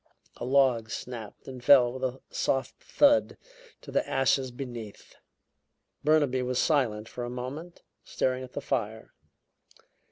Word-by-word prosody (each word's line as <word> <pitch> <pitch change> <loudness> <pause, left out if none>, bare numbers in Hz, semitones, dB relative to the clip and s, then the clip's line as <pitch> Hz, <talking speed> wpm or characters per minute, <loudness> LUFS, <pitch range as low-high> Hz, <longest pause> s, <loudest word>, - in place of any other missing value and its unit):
A - - -5
log 130 -4 +3
snapped 115 -2 -7
and 130 -2 -8
fell 125 -2 +6
with 130 0 -7
a 130 0 -2
soft 135 0 -1
thud 285 -1 +3 0.4
to - - -10
the - - 0
ashes 135 0 +2
beneath. 120 -4 -8 0.9
Burnaby 145 -4 +3
was 125 0 -2
silent 120 -10 +1
for 120 - -6
a 120 - -4
moment, 135 +8 -7 0.2
staring 130 0 -1
at 130 - -11
the 145 - -4
fire. 110 -5 -3
130 Hz, 135 wpm, -28 LUFS, 120-135 Hz, 0.9 s, fell